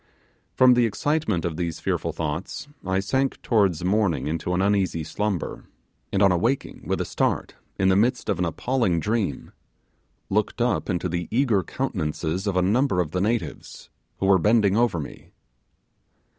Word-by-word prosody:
From 130 -1 +6
the 120 -1 +3
excitement 110 - -1
of 80 -2 -3
these 85 -1 -3
fearful - - -1
thoughts 80 - -4 0.2
I 95 0 0
sank 130 +7 0
towards 95 -8 +2
morning 95 -8 +1
into 85 +3 -2
an - - 0
uneasy 95 -4 +1
slumber; 100 +2 -3 0.5
and 100 0 +2
on 100 - +6
awaking, 115 +10 -1
with - - 0
a - - -1
start, - - -1 0.2
in 95 0 +3
the 95 - +4
midst 120 +6 +1
of 100 -5 0
an 90 - +1
appalling 95 +1 0
dream, 105 +3 -2 0.8
looked 105 +4 -1
up 120 -1 0
into 90 -1 -1
the 85 0 -3
eager 115 -4 +2
countenance 90 - -3
of 95 +4 -1
a 90 - +3
number 110 +1 +2
of 80 -4 -1
the 90 - -1
natives, 115 +3 -3 0.3
who - - -2
were 95 -1 +5
bending 105 0 +3
over 115 -7 +2
me. 75 - -9
95 Hz, 165 wpm, -24 LUFS, 85-115 Hz, 0.8 s, From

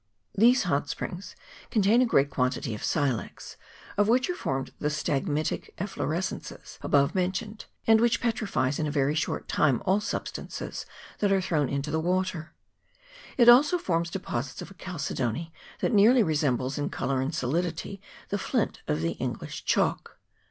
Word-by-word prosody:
These 240 +5 +5
hot 145 -5 0
springs 180 +2 -5 0.3
contain 220 +2 +4
a 255 - +3
great 140 -9 +3
quantity 125 -2 -1
of 105 - -7
silex, 140 -7 -2 0.4
of 205 0 +4
which 255 +9 +3
are - - -4
formed 135 - -3
the 150 - -1
stalagmitic 150 +1 -2
efflo 195 +2 -3
rescences 170 +5 -4
above 140 -1 +2
mentioned, 195 +4 -2 0.2
and 225 0 +5
which 235 -1 +3
petrifies 200 - 0
in 155 - 0
a - - -2
very 145 0 +1
short 155 - -2
time 140 -6 +2
all 190 +3 +3
substances - - -5 0.3
that 205 -1 +2
are 195 - +4
thrown 155 -7 0
into 140 +2 -2
the 160 - +1
water; 180 -1 -1 0.8
it 240 -2 +5
also 280 +8 +7
forms 170 - -1
deposits 140 -8 -4
of 175 - -11
a - - -11
chalcedony 165 - -3 0.3
that - - +1
nearly 225 +4 +6
resembles 145 - 0
in 145 - -1
colour 135 0 -1
and 140 +5 -2
solidity 170 +7 -2 0.3
the 200 - -1
flint - - -1
of 75 - 0
the 85 0 0
English - - -5
chalk. - - 0
165 Hz, 160 wpm, -27 LUFS, 140-200 Hz, 0.8 s, also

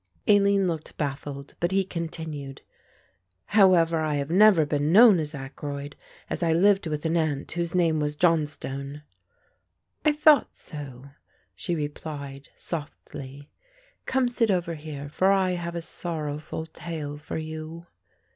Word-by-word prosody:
Aline 200 -2 +4
looked 160 -3 -4
baffled, 140 -1 -4
but 175 - +1
he 195 +1 +2
continued, 160 -6 -6 0.8
"However, 180 -5 +4
I 155 -1 0
have 140 +2 -2
never 190 -4 +6
been 145 +1 0
known 210 -1 +8
as 155 -1 -4
Ackroyd, 140 +1 -6 0.3
as - - -4
I 165 -2 +2
lived 195 +2 +4
with 150 0 -3
an 165 +1 +1
Aunt 155 -4 -1
whose 170 0 -2
name 165 -3 +3
was 150 0 -1
Johnstone." 150 -3 -1 1.0
"I 305 - +5
thought 300 -2 +4
so," 140 -3 -9 0.4
she 100 - -3
replied 145 -2 -6
softly. 145 -3 -8 0.6
"Come 260 -1 +2
sit 235 -2 +1
over 175 -3 0
here, 150 -2 -7
for 185 +6 +2
I 190 -2 +3
have 170 -1 -4
a 170 - -4
sorrowful 155 -2 -5
tale 155 -3 -6
for 150 - -5
you." 160 +1 -6
160 Hz, 135 wpm, -26 LUFS, 145-175 Hz, 1.0 s, known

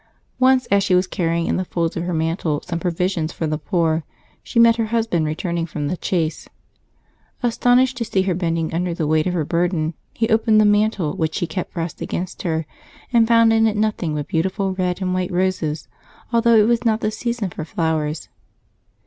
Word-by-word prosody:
Once 260 0 +4
as 200 0 +4
she 190 -2 +2
was 180 +1 +3
carrying 170 -2 -1
in - - 0
the 185 - -1
folds 170 -2 -2
of 170 - -3
her 180 - -2
mantle 160 -1 -1
some 170 -1 -3
provisions 175 -1 -1
for 165 - -4
the 155 -1 -2
poor, 165 -1 0 0.4
she - - -6
met 230 0 +6
her 225 -1 0
husband 220 -8 0
returning 170 +2 -2
from 150 -2 -4
the 180 - -1
chase. 165 -4 -2 0.9
Astonished 245 +2 +3
to 235 - -2
see 195 -3 +1
her 190 -1 0
bending 165 -2 -1
under 175 0 -1
the 165 - -1
weight 155 +2 +2
of 180 - -1
her 160 -4 0
burden, 170 -1 0 0.2
he 225 - -1
opened 220 -1 +4
the 215 - +5
mantle 205 -6 +2
which 160 -1 -1
she - - 0
kept 170 +2 -5
pressed 165 -2 -4
against 180 +1 -4
her, 160 -3 -1 0.5
and 230 -1 +5
found 230 -1 +5
in 225 0 +4
it 215 -1 -1
nothing 210 -7 -1
but 145 -1 -3
beautiful 190 +3 -1
red 185 0 -2
and 185 0 -1
w^ite 185 -1 -1
roses, 175 -4 -1 0.5
although 235 0 +4
it 215 -1 +5
was 235 0 +2
not 225 -2 +1
the 215 - 0
season 230 -3 -3
for 160 - -6
flowers. 155 -1 -2
180 Hz, 200 wpm, -21 LUFS, 165-215 Hz, 0.9 s, met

